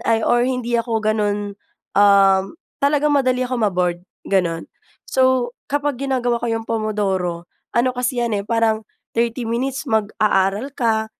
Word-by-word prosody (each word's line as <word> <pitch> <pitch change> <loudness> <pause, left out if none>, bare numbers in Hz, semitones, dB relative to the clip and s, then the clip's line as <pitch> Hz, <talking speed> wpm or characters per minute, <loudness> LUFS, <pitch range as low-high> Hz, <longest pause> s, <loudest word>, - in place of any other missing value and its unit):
ay 225 -1 +3
or 240 0 +3
hindi 240 -2 -1
ako 230 -1 -2
gano’n, 205 -1 0 0.4
um, 195 -1 +5 0.4
talagang 295 +1 +2
madali 255 -2 +2
akong 250 -1 -2
ma-bored, 180 -2 -1 0.3
gano’n. 170 -4 0 0.4
So, 260 -2 +2 0.2
kapag 290 -2 -1
ginagawa 245 -3 0
ko 235 - -2
‘yong 225 0 -2
Pomodoro, 195 -6 -1 0.3
ano 250 +2 +3
kasi 250 0 -1
‘yan 235 - -2
eh, - - -8
parang 225 -1 +1 0.3
30 235 +1 0
minutes 260 +3 -2
mag-aaral 215 +2 +1
ka, 220 -2 +1
230 Hz, 140 wpm, -20 LUFS, 205-250 Hz, 0.4 s, um